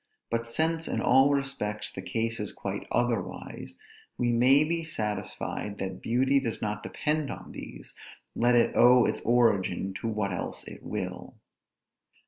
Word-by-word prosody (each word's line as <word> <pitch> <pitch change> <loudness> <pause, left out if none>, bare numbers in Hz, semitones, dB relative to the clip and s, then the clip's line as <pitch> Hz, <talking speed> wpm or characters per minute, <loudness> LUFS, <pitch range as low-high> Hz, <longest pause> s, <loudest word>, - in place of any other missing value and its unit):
But 115 0 -1
since, 160 +5 0
in - - -1
all 135 +2 +5
respects, 135 -7 -2
the 95 - -6
case 115 +4 -2
is 105 - -4
quite 100 0 -5
otherwise; 120 -6 -2 0.4
we 120 -1 +1
may 130 +5 +5
be 165 +2 -1
satisfied 105 -6 -4
that 95 -1 -5
beauty 130 +4 +3
does 120 -4 -3
not 105 0 -3
depend 150 +3 -1
on - - -7
these, - - -9 0.4
let 120 +1 +3
it 120 - +3
owe 125 0 +7
its - - -1
origin 100 -6 +2
to - - -2
what 105 -3 -1
else 90 - -4
it - - -9
will. - - -5
115 Hz, 150 wpm, -28 LUFS, 105-135 Hz, 0.4 s, owe